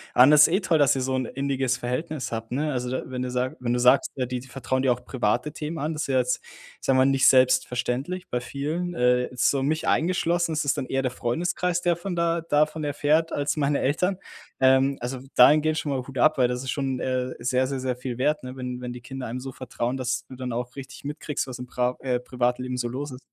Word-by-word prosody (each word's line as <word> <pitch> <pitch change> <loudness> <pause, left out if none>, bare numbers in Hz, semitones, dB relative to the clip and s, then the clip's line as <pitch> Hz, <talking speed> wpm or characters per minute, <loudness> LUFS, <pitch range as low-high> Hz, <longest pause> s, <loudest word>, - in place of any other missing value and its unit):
Anders 145 +4 +8
eh, 180 +4 +2
toll, 165 -4 +2
dass 145 -2 +4
ihr 135 - -1
so 130 +1 -1
'n 130 -1 -1
inniges 135 -1 -1
Verhältnis 130 +3 -3
habt, 115 0 -5
ne? 150 +4 -1
Also 125 -2 -2
da 130 - -2
wenn 130 -1 -5
du 125 - -2
sag 125 +1 -2
wenn 120 -1 -1
du 125 - 0
sagst, 125 +2 +4
äh, 130 - -1
die 125 0 -3
die 130 - -13
vertrauen 130 0 -2
dir 130 - +3
auch 125 +1 -12
private 125 +4 0
Themen 155 +2 -5
an, 155 +2 -2
das 150 - -3
ist - - -4
ja 135 -1 +1
jetzt, 125 - 0
ich - - -15
sage 135 - +3
mal, 130 - +5
nicht 135 0 +4
selbstverständlich 130 +6 +2
bei 125 - -1
vielen. 155 +8 -3
Äh, 125 0 +3
jetzt 125 -1 +2
so 135 -1 0
mich 155 +3 -1
eingeschlossen, 175 0 +1
ist 155 -1 -1
es 140 - +3
dann - - -3
eher 135 - 0
der 130 - 0
Freundeskreis, 175 +8 -1
der 175 -1 +2
von 175 +2 -5
da 170 0 +1
davon 155 0 +1
erfährt, 150 +3 +1
als 145 +2 0
meine 145 -1 +1
Eltern. 180 +8 +1 0.4
Ähm, 130 +1 +4
also 125 +2 -4 0.2
dahin 150 +5 +7
gehend 155 0 0
ich - - 0
schon 145 - -3
mal 135 - 0
Hut 135 -1 -8
ab, 155 - +4
weil 125 - +5
das 125 +1 -3
ist 130 - -3
schon, 135 -3 -2
äh, 130 0 -2
sehr, 130 +2 +1
sehr, 135 -1 -3
sehr 130 -1 -2
viel 125 -1 -5
wert, 150 +4 +1
ne, 125 +1 -7
wenn 125 -1 -5
wenn 125 - -5
die 125 - -9
Kinder 130 +1 -6
einem 120 +3 -4
so 135 +1 -6
vertrauen, 125 0 -3
dass 130 0 -2
du 130 - -10
dann 125 -1 -5
auch 120 +1 -4
richtig 135 -1 -9
mitkriegst, 150 +1 -3
was 130 -1 -8
im 125 - -7
pra 125 0 -1
äh, 125 -2 -1
Privatleben 125 0 -2
so 120 -1 -1
los 135 +3 -5
ist. 125 - -8
130 Hz, 255 wpm, -25 LUFS, 125-150 Hz, 0.4 s, Anders